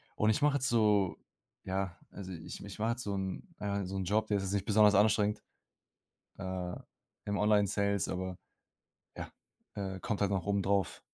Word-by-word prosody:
Und 105 Hz, -, +2 dB
ich 110 Hz, -, +2 dB
mache 145 Hz, -1 st, +4 dB
jetzt 130 Hz, -2 st, +1 dB
so, 105 Hz, -5 st, +3 dB, 0.5 s
ja 95 Hz, -2 st, -2 dB
also 95 Hz, -2 st, -7 dB
ich 80 Hz, +1 st, -7 dB
ich 100 Hz, +1 st, -9 dB
mache 110 Hz, +2 st, +1 dB
halt 120 Hz, +1 st, -1 dB
so 100 Hz, -4 st, -2 dB
'n 95 Hz, -1 st, -3 dB, 0.2 s
äh, 100 Hz, -1 st, -1 dB
so 95 Hz, +1 st, -4 dB
'n 95 Hz, -, -2 dB
Job, 110 Hz, +3 st, +1 dB
der 105 Hz, -, +2 dB
ist 95 Hz, -, -2 dB
jetzt 95 Hz, +1 st, -2 dB
nicht 100 Hz, -, 0 dB
besonders 105 Hz, -2 st, +5 dB
anstrengend, 105 Hz, 0 st, +3 dB, 0.9 s
äh, 95 Hz, -2 st, -4 dB, 0.5 s
im 100 Hz, -1 st, -1 dB
Online-Sales, 100 Hz, -1 st, +2 dB
aber 95 Hz, 0 st, -3 dB, 0.8 s
ja, -, -, -6 dB, 0.4 s
äh, 95 Hz, -2 st, -4 dB
kommt 105 Hz, -4 st, -2 dB
halt 100 Hz, 0 st, +2 dB
noch 95 Hz, -4 st, 0 dB
oben 100 Hz, -1 st, +1 dB
drauf. 100 Hz, -1 st, +1 dB
100 Hz, 185 wpm, -32 LUFS, 95-105 Hz, 0.9 s, besonders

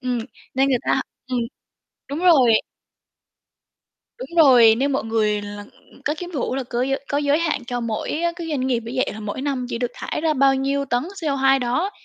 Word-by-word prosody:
ừm, 250 Hz, -1 st, -1 dB, 0.4 s
nên 270 Hz, +1 st, +3 dB
người 255 Hz, -3 st, +2 dB
ta -, -, +2 dB, 0.3 s
ừm, 255 Hz, -1 st, -2 dB, 0.7 s
đúng 285 Hz, -, -3 dB
rồi. 290 Hz, -10 st, +5 dB, 1.7 s
Đúng -, -, -7 dB
rồi, 245 Hz, -8 st, +7 dB
nên 275 Hz, +4 st, 0 dB
mọi 265 Hz, -, -1 dB
người 215 Hz, -2 st, 0 dB
là 205 Hz, 0 st, -7 dB, 0.4 s
có 295 Hz, -, 0 dB
cái 355 Hz, -, -6 dB
vụ 260 Hz, -, -1 dB
ấy 260 Hz, -, -2 dB
là 270 Hz, -, -2 dB
cớ 240 Hz, 0 st, -2 dB
giới 270 Hz, +1 st, -1 dB
có 285 Hz, -, 0 dB
giới 290 Hz, +1 st, +2 dB
hạn 325 Hz, -6 st, -1 dB
cho 245 Hz, 0 st, -3 dB
mỗi, 230 Hz, -2 st, -3 dB
á, 340 Hz, +2 st, 0 dB
cái 335 Hz, -2 st, -6 dB
doanh 270 Hz, -4 st, -1 dB
nghiệp 250 Hz, -3 st, +1 dB
như 235 Hz, -, -5 dB
vậy 260 Hz, -, +1 dB
là 220 Hz, -, -8 dB
mỗi 210 Hz, +5 st, -5 dB
năm 270 Hz, -3 st, -2 dB
chỉ 230 Hz, -, -3 dB
được 245 Hz, -1 st, -1 dB
thải -, -, -4 dB
ra 315 Hz, -1 st, +1 dB
bao 270 Hz, 0 st, +4 dB
nhiêu 275 Hz, +1 st, 0 dB
tấn 245 Hz, -2 st, 0 dB, 0.2 s
CO2 270 Hz, -3 st, +2 dB
đó. 255 Hz, +10 st, 0 dB
265 Hz, 215 wpm, -22 LUFS, 240-285 Hz, 1.7 s, rồi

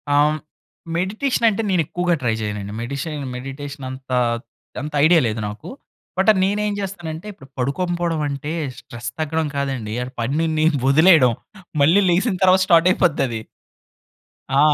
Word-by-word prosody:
ఆహ్, 145 Hz, +1 st, +5 dB
హ్మ్, 155 Hz, -, -2 dB, 0.6 s
మెడిటేషన్ 220 Hz, +8 st, 0 dB
అంటే 215 Hz, +1 st, -1 dB
నేనేక్కువగా 175 Hz, 0 st, +1 dB
ట్రై 115 Hz, -2 st, +2 dB
చేయనండి 105 Hz, -1 st, -4 dB
మెడిషన్ 140 Hz, +4 st, -4 dB
మెడిటేషన్ 140 Hz, +2 st, -7 dB
అంత 130 Hz, 0 st, -10 dB, 0.7 s
అంత 150 Hz, +1 st, -6 dB
ఐడియా 170 Hz, +1 st, +6 dB
లేదు 110 Hz, 0 st, -2 dB
నాకు. 105 Hz, +1 st, -8 dB, 0.5 s
బట్, 190 Hz, +3 st, +3 dB
నేనేం 205 Hz, +2 st, 0 dB
చేస్తానంటే 175 Hz, -3 st, -5 dB
ఇప్పుడు 160 Hz, -9 st, -15 dB
పడుకోంకపోవడం 170 Hz, +4 st, -1 dB
అంటే, 140 Hz, +2 st, -4 dB, 0.3 s
స్ట్రెస్ 120 Hz, 0 st, -7 dB
తగ్గడం 160 Hz, 0 st, 0 dB
కాదండి. 130 Hz, -6 st, -2 dB
ఆ -, -, -4 dB, 0.2 s
పనిని 155 Hz, +5 st, 0 dB, 0.2 s
వదిలేయడం. 155 Hz, -2 st, +6 dB, 0.5 s
మళ్ళీ 165 Hz, +8 st, +5 dB
లెగిసిన 190 Hz, +5 st, +2 dB
తర్వాత 185 Hz, 0 st, +5 dB
స్టార్ట్ 170 Hz, -1 st, +5 dB
అయిపోద్దది. 140 Hz, -10 st, +1 dB, 1.2 s
ఆ! -, -, +5 dB
155 Hz, 130 wpm, -21 LUFS, 135-180 Hz, 1.2 s, ఐడియా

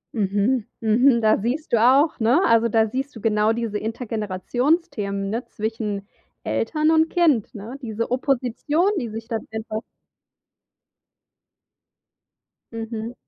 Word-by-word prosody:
Mhm, 210 Hz, +3 st, +1 dB
mhm. 235 Hz, +3 st, +4 dB
Da 215 Hz, -1 st, +3 dB
siehst 245 Hz, +7 st, -3 dB
du -, -, +6 dB
auch, 275 Hz, +6 st, +4 dB
ne? 235 Hz, +7 st, +4 dB
Also, 230 Hz, -6 st, +4 dB
da 220 Hz, 0 st, +3 dB
siehst 270 Hz, +5 st, -4 dB
du -, -, -8 dB
genau 215 Hz, 0 st, +2 dB
diese 225 Hz, -2 st, -2 dB
Intergenerationsthemen, 215 Hz, -, -2 dB
ne, 235 Hz, +3 st, -2 dB
zwischen 210 Hz, -2 st, -4 dB, 0.4 s
Eltern 310 Hz, 0 st, 0 dB
und 320 Hz, 0 st, +3 dB
Kind, 300 Hz, -, +2 dB
ne? 230 Hz, +7 st, -8 dB
Diese 230 Hz, 0 st, -4 dB
Opposition, 275 Hz, -, +1 dB
die 235 Hz, -, -4 dB
sich 225 Hz, +1 st, -7 dB
dann 225 Hz, -2 st, -4 dB
einfach 220 Hz, 0 st, -4 dB, 2.9 s
Mhm. 225 Hz, 0 st, -5 dB
230 Hz, 120 wpm, -23 LUFS, 215-260 Hz, 2.9 s, du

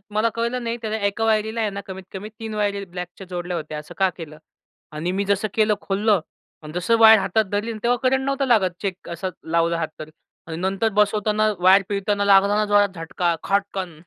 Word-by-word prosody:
मला 225 Hz, +2 st, +3 dB
कळलं 235 Hz, +2 st, -2 dB
नाही, 230 Hz, 0 st, -2 dB
त्याला 220 Hz, -1 st, -2 dB
एका 210 Hz, +3 st, -2 dB
वायरीला 220 Hz, +1 st, +1 dB
आहे 215 Hz, -, +1 dB
ना, 200 Hz, 0 st, -6 dB
कमीत 190 Hz, 0 st, -7 dB
कमी 205 Hz, +3 st, -6 dB
3 220 Hz, -1 st, -5 dB
वायरी 200 Hz, -1 st, -1 dB
ब्लॅकच्या 180 Hz, +1 st, -8 dB
जोडल्या 175 Hz, -1 st, -4 dB
होत्या. 155 Hz, -1 st, -6 dB
असं 150 Hz, -, -11 dB
का 190 Hz, -1 st, +3 dB
केलं? 155 Hz, -2 st, -9 dB, 0.6 s
आणि 165 Hz, +4 st, -3 dB
मी 200 Hz, +1 st, -1 dB
जसं 200 Hz, +2 st, 0 dB
केलं 215 Hz, -1 st, +3 dB
खोललं, 205 Hz, -1 st, +1 dB, 0.4 s
अन 150 Hz, -, -9 dB
जसं 180 Hz, +7 st, +1 dB
वायर 220 Hz, -1 st, +9 dB
हातात 195 Hz, +3 st, +1 dB
धरली, 210 Hz, +3 st, -1 dB
तेव्हा 245 Hz, +1 st, +2 dB
करंट 265 Hz, +1 st, +2 dB
नव्हतं 275 Hz, 0 st, 0 dB
लागत 210 Hz, -7 st, +3 dB
चेक 190 Hz, -2 st, -4 dB
असा 170 Hz, +3 st, -3 dB, 0.2 s
लावला 170 Hz, 0 st, +2 dB
हात 160 Hz, -, -1 dB
तर 155 Hz, 0 st, -8 dB, 0.4 s
आणि 160 Hz, -1 st, -5 dB
नंतर 195 Hz, +4 st, 0 dB
बसवताना 210 Hz, +1 st, +2 dB
वायर 190 Hz, +2 st, +6 dB
पिळताना 200 Hz, 0 st, 0 dB
लागला 200 Hz, +1 st, +5 dB
ना 215 Hz, -, +2 dB
जोरात 205 Hz, 0 st, +4 dB
झटका, 170 Hz, +1 st, -1 dB
खटकन. 195 Hz, -5 st, -2 dB
200 Hz, 200 wpm, -22 LUFS, 180-215 Hz, 0.6 s, वायर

